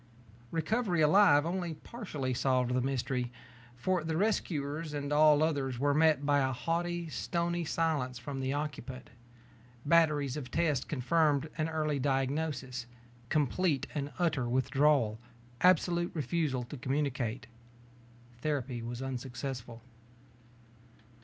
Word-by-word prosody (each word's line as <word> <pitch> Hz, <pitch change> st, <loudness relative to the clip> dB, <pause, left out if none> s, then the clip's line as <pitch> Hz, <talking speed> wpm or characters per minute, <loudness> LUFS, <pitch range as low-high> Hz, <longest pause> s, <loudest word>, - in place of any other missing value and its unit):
Recovery 175 Hz, +2 st, 0 dB
alive 150 Hz, -2 st, +6 dB
only 175 Hz, -1 st, -2 dB
partially 150 Hz, -, -5 dB
solved 125 Hz, -1 st, +1 dB
the 125 Hz, -, +2 dB
mystery, 125 Hz, -1 st, -1 dB, 0.4 s
for 180 Hz, +7 st, 0 dB
the 160 Hz, 0 st, -2 dB
rescuers 155 Hz, -6 st, -1 dB
and 145 Hz, 0 st, -2 dB
all 150 Hz, 0 st, +6 dB
others 140 Hz, -5 st, 0 dB
were 145 Hz, +3 st, +2 dB
met 155 Hz, -2 st, +3 dB
by 145 Hz, 0 st, +3 dB
a 130 Hz, -1 st, +1 dB
haughty, 170 Hz, +5 st, -2 dB
stony 170 Hz, +2 st, -1 dB
silence 150 Hz, -6 st, -1 dB
from 135 Hz, +3 st, -6 dB
the 130 Hz, 0 st, -1 dB
occupant. 140 Hz, -3 st, -5 dB, 0.7 s
Batteries 150 Hz, -4 st, +3 dB
of 130 Hz, -4 st, -6 dB
tests 150 Hz, -4 st, +1 dB
confirmed 155 Hz, +1 st, +1 dB
an 155 Hz, 0 st, -1 dB
early 155 Hz, -2 st, -1 dB
diagnosis: 135 Hz, -2 st, -1 dB, 0.4 s
complete 150 Hz, 0 st, +1 dB
and 145 Hz, -1 st, -3 dB
utter 150 Hz, -9 st, 0 dB
withdrawal; 130 Hz, -3 st, +2 dB, 0.4 s
absolute 175 Hz, -1 st, +3 dB
refusal 145 Hz, -3 st, -1 dB
to 130 Hz, +4 st, -8 dB
communicate. 130 Hz, -3 st, -2 dB, 0.9 s
Therapy 130 Hz, -4 st, -2 dB
was 120 Hz, +2 st, -5 dB
unsuccessful. 125 Hz, -2 st, -5 dB
145 Hz, 115 wpm, -31 LUFS, 130-160 Hz, 0.9 s, alive